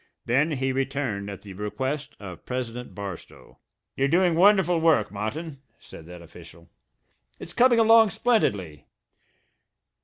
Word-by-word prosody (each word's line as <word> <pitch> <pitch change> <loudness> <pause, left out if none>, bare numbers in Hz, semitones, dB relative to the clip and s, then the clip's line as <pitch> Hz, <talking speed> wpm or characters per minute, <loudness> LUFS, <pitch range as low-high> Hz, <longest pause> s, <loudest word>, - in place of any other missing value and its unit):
Then 140 +7 +1
he 135 -1 -1
returned 130 -7 -3
at 100 - -9
the 100 -2 -10
request 130 +9 -4
of 95 -4 -10
President 125 -4 -6
Barstow. 100 -4 -10 0.4
"You're 135 - +1
doing 175 +3 +2
wonderful 180 -1 +4
work, 155 -10 +2
Martin," 135 +9 -6 0.2
said 80 - -14
that 90 -1 -11
official. 85 0 -16 0.7
"It's - - -10
coming 245 -1 +4
along 225 -1 +6
splendidly. 100 - -1
130 Hz, 125 wpm, -25 LUFS, 100-165 Hz, 0.7 s, along